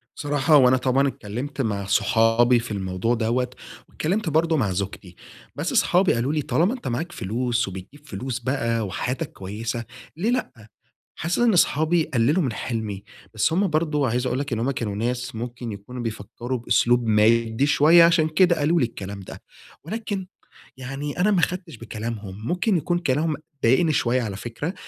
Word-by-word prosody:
صراحة 145 +1 +3
وأنا 130 -1 +5
طبعًا 130 +2 +2
اتكلّمت 135 +4 -5
مع 100 -5 -2
صحابي 115 +4 +3
في 115 -1 -7
الموضوع 95 +3 -1
دّوة، 120 +2 0 0.4
واتكلّمت 185 +3 -1
برضو 160 +1 +2
مع 110 -9 +1
زوجتي، 95 -1 -5 0.4
بس - - -2
صحابي 180 +1 +3
قالو 120 +5 0
لي: 155 - 0
"طالما 175 - +1
أنت 255 - -7
معاك 130 +8 -2
فلوس 120 - -1
وبتجيب 95 +11 -10
فلوس 120 +4 -4
بقى 115 -3 -1
وحياتك 130 - -3
كويّسة 110 +4 -5 0.3
ليه 200 +7 0
لأ؟" 130 - -3 0.5
حاسس 170 +2 -1
إن 240 -2 +4
أصحابي 165 -1 +3
قللوا 150 +5 +1
من 130 -5 -1
حلمي، 110 -5 -4 0.3
بس 110 +9 +1
هم 195 +4 +2
برضو 155 -3 0
عايز 125 +1 0
أقول 125 +1 -1
لك 140 -2 -3
إن 115 - -1
هم 125 +4 0
كانوا 110 -6 -3
ناس 120 +3 -2
ممكن 120 +1 -5
يكونوا 105 +5 -8
بيفكروا 115 +3 -4
بأسلوب 120 0 +2
مادي 110 +3 +3
شويّة 155 +3 +6
عشان 165 -2 +4
كده 175 +2 +4
قالو 160 +4 +2
لي 130 - +3
الكلام، 100 -3 -7
ده 95 - -10 0.4
ولكن 200 +1 -4 0.5
يعني 135 +5 -5
أنا 200 +4 +4
ما 195 -4 +3
أخدتش 180 -4 -2
بكلامهم 110 -2 -6
ممكن 180 +4 +1
يكون 175 +2 0
كلامهم 155 -1 0 0.3
ضايقني 135 +8 +4
شويّة 125 -2 +1
على 105 -4 -4
فكرة، 120 - -5
125 Hz, 165 wpm, -23 LUFS, 115-155 Hz, 0.5 s, شويّة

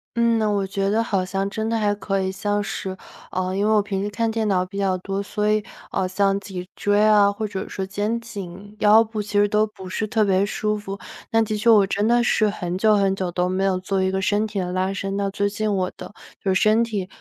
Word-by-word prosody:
嗯， 235 -1 +3 0.2
我 200 -1 0
觉 195 0 -1
得 220 +3 +2
好 195 -5 0
像 195 +1 -2
真 220 +1 -2
的 230 - +1
还 210 -2 +1
可 195 -1 -2
以。 190 0 -1
像 205 +1 -1
是， 190 -1 -5 0.3
呃， 185 0 -2
因 200 +1 +1
为 - - +3
我 215 - +5
平 200 -1 -3
时 205 - -2
看 225 +2 -1
电 220 -1 -1
脑 185 -2 +2
比 185 - -13
较 195 -2 +1
多， 195 +2 -3
所 210 +1 -1
以， 215 0 +1 0.3
呃， 190 -1 0
像 195 +1 +1
脊 185 -2 -7
椎 205 0 +1
啊， 205 -2 +5
或 215 +1 -3
者 195 -1 -5
说 190 - -4
肩 210 +4 -2
颈、 205 -3 -9
腰 215 +2 +6
部 220 -1 -4
其 210 0 -8
实 205 - +4
都 210 +1 +2
不 195 -3 -11
是 205 +4 -2
特 215 0 +2
别 190 -1 +3
舒 210 +1 -1
服。 200 -1 -7 0.3
但 225 0 +3
的 215 - -2
确 210 +3 +2
我 210 -3 +7
真 205 +2 0
的 240 +1 +4
是 215 -3 +2
很 180 -3 -4
久 215 +2 +4
很 195 -1 +2
久 185 -2 -3
都 180 +1 0
没 185 +1 -1
有 190 -1 +1
做 190 +1 -1
一 190 - +1
个 190 0 -1
身 205 +3 +1
体 210 -1 -7
的 180 -1 -2
拉 185 +1 0
伸， 195 0 -3
那 200 0 0
最 200 +1 0
近 210 +1 -2
我 185 -1 -1
的 - - -9 0.3
就 190 -1 +1
身 215 +4 +4
体 210 -5 -3
200 Hz, 270 characters per minute, -23 LUFS, 190-215 Hz, 0.3 s, 我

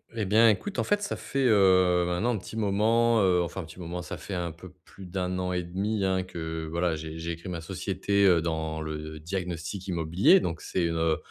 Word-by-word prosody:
Eh 110 - -1
bien, 110 +4 +6
écoute, 195 - -1
en - - +2
fait, 205 0 0
ça 205 - -2
fait, 135 -1 -2
heu, 95 -4 +5
maintenant 95 +8 0
un - - -1
petit 110 - -9
moment, 110 +3 +3
heu, 90 -2 +3
enfin 85 +3 -5
un - - -7
petit 80 +3 -13
moment, 90 0 -5
ça 85 - -6
fait 100 - -7
un 85 -2 -2
peu 85 +3 -12
plus 95 - -13
d'1 90 0 -3
an 90 0 -2
et 90 - 0
1/2, 100 +4 -2
hein, 95 -1 +1
que 80 -3 -5
voilà, 85 0 0
j'ai 80 +1 -7
j'ai 85 +1 -3
crée 85 +3 -12
ma 85 -2 -4
société 95 0 +1
dans 80 -1 -2
le 80 0 -6
diagnostic 90 +2 -4
immobilier 85 - +4
donc 85 - -3
c'est, 90 -2 -1
heu 80 -1 +1
90 Hz, 220 wpm, -27 LUFS, 85-100 Hz, -, bien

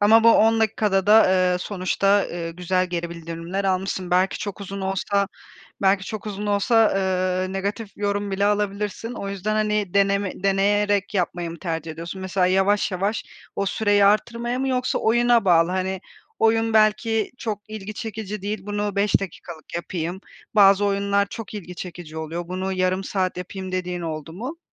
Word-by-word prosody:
Ama 225 +2 +6
bu 230 - +9
10 225 +1 +4
dakikada 205 -3 +1
da, 220 +1 +7 0.3
eee, 180 - 0
sonuçta, 195 +1 +1
ııı, 170 -1 -4
güzel 180 +2 0
geri 170 -1 -3
bildirimler 170 +3 -5
almışsın. 185 -1 -1
Belki 185 +2 +2
çok 205 0 -5
uzun 195 0 -6
olsa 195 +1 0 0.5
belki 195 0 +3
çok 215 0 -6
uzun 205 0 -4
olsa, 215 +2 +3
ııı, 185 -1 0
negatif 200 +2 -3
yorum 205 0 -1
bile 195 +1 0
alabilirsin. 210 +2 -1
O 200 - -5
yüzden, 200 +2 -2
hani, 210 -3 0
deneme 200 -1 +2
deneyerek 200 +1 +2
yapmayı 175 -2 -1
mı 165 - -9
tercih 165 -1 -4
ediyorsun? 170 +4 -7
Mesela 190 -1 +1
yavaş 195 +2 +2
yavaş 200 +4 -1 0.3
o 200 - 0
süreyi 205 -1 +3
arttırmaya 235 +4 +1
mı 270 0 -1
yoksa 255 -1 0
oyuna 240 0 +3
bağlı, 170 -2 +4
hani, 190 0 -2 0.4
"Oyun 225 0 +2
belki 215 0 +2
çok 210 -2 -4
ilgi 215 -1 -6
çekici 210 -1 -5
değil 205 -1 -4
bunu 205 -1 -2
5 200 +1 +3
dakikalık 170 -3 -8
yapayım. 170 +1 -4 0.3
Bazı 200 -1 +6
oyunlar 200 0 +1
çok 215 0 -8
ilgi 180 -3 -7
çekici 170 -3 -8
oluyor. 165 +2 -5
Bunu 185 +1 -2
yarım 185 +1 0
saat 185 -2 -1
yapayım." 185 +1 -6
dediğin 180 -1 -2
oldu 160 -2 -5
mu? 250 - -6
195 Hz, 165 wpm, -23 LUFS, 185-210 Hz, 0.5 s, bu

